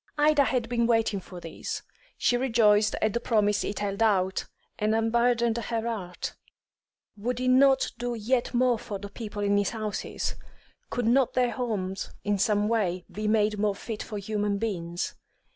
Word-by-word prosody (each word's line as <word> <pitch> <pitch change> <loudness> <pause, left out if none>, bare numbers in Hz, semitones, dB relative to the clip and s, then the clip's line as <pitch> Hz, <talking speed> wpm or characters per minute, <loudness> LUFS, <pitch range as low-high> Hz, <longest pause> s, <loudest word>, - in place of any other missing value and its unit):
Ida 295 -1 +4
had 250 -3 0
been 235 -1 +1
waiting 225 -3 +2
for 180 -1 -10
this; 165 -1 -6 0.3
she 245 - +2
rejoiced 225 -4 +3
at 215 -1 +2
the 235 - 0
promise 210 -3 +2
it 205 - -3
held 200 0 -2
out, 190 -4 +2 0.3
and 215 +1 +2
unburdened 235 +1 +2
her 230 0 -2
heart. 190 -6 -4 0.8
Would 235 +4 -2
he 255 +1 -1
not 265 +1 +5
do 245 0 -2
yet 240 +3 0
more 245 -1 +2
for 205 - -5
the 200 +1 -8
poor - - -31
people 210 -3 -5
in 205 0 +3
his 205 -1 +2
houses? 215 -2 -3 0.6
Could 245 - -2
not 250 +2 +3
their 250 -1 +3
homes 200 -7 -3
in 205 -1 0
some 210 +1 +2
way 185 -6 0
be 210 +1 -3
made 210 -1 +2
more 205 -1 +1
fit 215 +1 -6
for 210 - -5
human 205 0 -1
beings? 175 -5 -3
220 Hz, 175 wpm, -27 LUFS, 205-235 Hz, 0.8 s, not